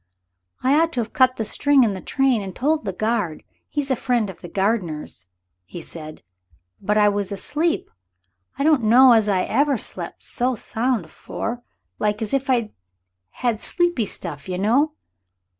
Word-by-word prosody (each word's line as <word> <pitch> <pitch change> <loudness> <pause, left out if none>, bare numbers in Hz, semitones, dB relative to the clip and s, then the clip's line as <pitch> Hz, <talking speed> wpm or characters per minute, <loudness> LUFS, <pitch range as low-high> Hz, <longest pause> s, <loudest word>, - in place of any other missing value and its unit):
"I 260 +2 +3
ought 330 0 +1
to 250 - -2
have 230 -1 -3
cut 255 -3 +4
the 220 - -3
string 285 +4 +3
in 215 -4 +1
the 190 - -6
train 265 -5 +1
and 190 -2 -7
told 305 +4 0
the - - -1
guard 215 -5 -1 0.3
he's 285 -2 -2
a - - +3
friend 240 -5 0
of 175 - -18
the 175 - -8
gardener's," 175 - -2 0.4
he 130 - -9
said, 155 -1 -10 0.6
"but 210 +2 +1
I 210 -1 +5
was 205 -1 0
asleep. 300 - -1 0.7
I 275 - -1
don't 305 -3 +4
know 245 +4 +7
as 220 -2 +3
ever 275 +9 +2
I - - +2
slep' - - -6
so 250 +1 0
sound 230 -2 -1
afore. 230 +8 -5 0.4
Like 210 0 0
as 215 - -5
if 275 0 0
I'd 235 -4 +1 0.6
had 235 -3 -2
sleepy 345 - 0
stuff 155 -5 -7
you 180 - -2
know. 250 +10 +2
225 Hz, 175 wpm, -22 LUFS, 195-265 Hz, 0.7 s, know